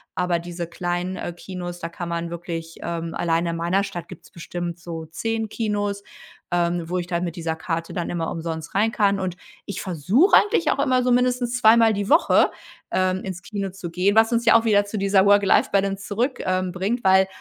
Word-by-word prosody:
Aber 175 -1 0
diese 175 0 -5
kleinen, 175 +2 -3
äh, 175 - -4
Kinos, 175 0 -7
da 165 -1 -5
kann 170 0 -6
man 170 0 -3
wirklich, 165 -1 -6
ähm 170 -1 -4
allein 165 0 0
in 170 0 -2
meiner 175 +4 +1
Stadt 175 -4 -6
gibt's - - -13
bestimmt 175 0 -6
so 165 -1 -7
10 225 +7 -3
Kinos, 205 -2 -2 0.5
ähm, 175 -1 0
wo 180 - -1
ich 175 - -2
dann 175 -1 -2
mit 170 -1 -5
dieser 165 -2 -3
Karte 165 0 -4
dann 175 - -3
immer 165 -2 -2
umsonst 165 -1 -5
rein 215 +3 +2
kann. 200 -2 +2
Und 185 -2 -3 0.3
ich 200 - -4
versuche 190 - +3
eigentlich 410 -4 +3
auch - - -1
immer, 255 -2 +2
so 250 - +1
mindestens 250 0 +1
zweimal 225 -1 +6
die 200 0 -3
Woche, 315 +4 +5 0.4
ähm, 185 0 0
ins 185 -1 -6
Kino 200 -2 -4
zu 185 -2 -8
gehen, 185 +4 +1
was 225 +2 +5
uns 235 0 +1
ja 225 - +6
auch 230 - -2
wieder 205 -2 +4
zu 205 +1 -5
dieser 195 -1 +3
Work-Life-Balance 200 0 +3
zurück, 240 +6 -1
ähm, 185 0 0
bringt, 195 +7 -2
weil, 190 0 +5
185 Hz, 205 wpm, -23 LUFS, 170-205 Hz, 0.5 s, zweimal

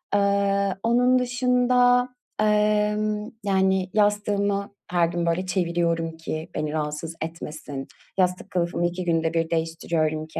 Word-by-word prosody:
Iıı, 200 -1 +2
onun 245 +2 +4
dışında, 250 0 +3 0.3
ımm, 210 0 +1
yani, 190 -1 +2
yastığımı 205 -1 +1 0.2
her 175 -2 +3
gün, 170 0 -2
böyle, 170 +2 0
çeviriyorum 170 -3 0
ki 160 0 -5
beni 150 -1 -2
rahatsız 155 +1 -3
etmesin. 155 -4 -6 0.3
Yastık 180 +1 0
kılıfımı 175 -2 0
2 175 +1 -2
günde 165 -1 +1
1 165 -1 0
değiştiriyorum 160 -1 -1
ki, - - -6
185 Hz, 120 wpm, -24 LUFS, 165-210 Hz, 0.3 s, onun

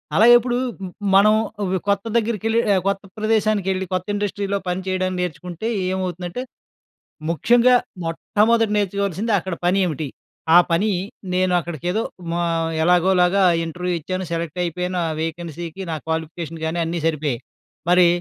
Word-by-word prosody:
అలాగే 230 +4 +7
ఇప్పుడు 240 +1 -2 0.6
మనం 210 +2 +6 0.3
ఒక 190 0 0
కొత్త 200 +1 +1
దగ్గరికెళ్ళి 225 0 0
ఆహ్, 185 - +2
కొత్త 200 0 0
ప్రదేశానికి 215 -2 +1
వెళ్ళి 190 0 -2
కొత్త 185 +1 -1
ఇండస్ట్రీలో 200 -1 -1
పని 180 +1 -1
చేయడం 185 0 0
నేర్చుకుంటే 180 +4 -4 0.2
ఏమవుతుందంటే, 185 +3 -3 0.9
ముఖ్యంగా 240 +8 +4 0.3
మొట్టమొదట 215 +6 +2
నేర్చుకోవాల్సింది 200 +1 -1
అక్కడ 180 0 -4
పని 190 +2 +3
ఏమిటి, 155 -3 -3 0.5
ఆ - - +11
పని 200 +6 +2 0.4
నేను 185 0 +2
అక్కడికేదో 175 +6 -2 0.4
ఆహ్, 165 -1 0
ఎలాగోలాగా 180 +2 +4 0.2
ఇంటర్వ్యూ 180 +2 -3
ఇచ్చాను, 185 +3 -4
సెలెక్ట్ 165 +1 -3
అయిపోయాను. 180 +2 -2
ఆ - - -2
వేకెన్సీకి 165 +2 -5
నా - - -1
క్వాలిఫికేషన్ 160 0 -4
కాని 170 +2 -1
అన్నీ 170 0 -2
సరిపోయాయి. 150 -6 -1 0.5
మరి 180 0 +6
180 Hz, 130 wpm, -21 LUFS, 170-200 Hz, 0.9 s, ఆ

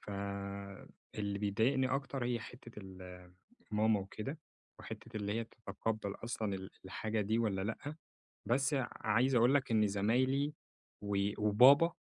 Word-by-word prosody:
فاللي 100 0 -5
بيدايقني 115 +6 +2
أكتر 135 -1 -2
هي 120 -1 0
حتّة 120 +1 -11
ال 90 -2 -10 0.4
ماما 105 0 +3
وكده، 110 +10 -6 0.4
وحتّة 115 -1 -8
اللي 105 -1 -1
هي 115 +1 -1
تتقبّل 110 -1 -4
أصلًا 110 -4 -2
ال 95 0 -6
الحاجة 110 +3 -2
دي 110 +3 +1
والّا 105 -5 +1
لأ، 140 +8 -4 0.5
بس 140 +5 +2
ع 130 -3 0
عايز 120 +5 +3
أقول 120 +3 +5
لك 135 -3 +2
إن 110 -2 +4
زمايلي 130 +9 +1 0.5
و 100 -1 -1 0.2
وبابا، 130 +11 +7
110 Hz, 135 wpm, -35 LUFS, 100-125 Hz, 0.5 s, وبابا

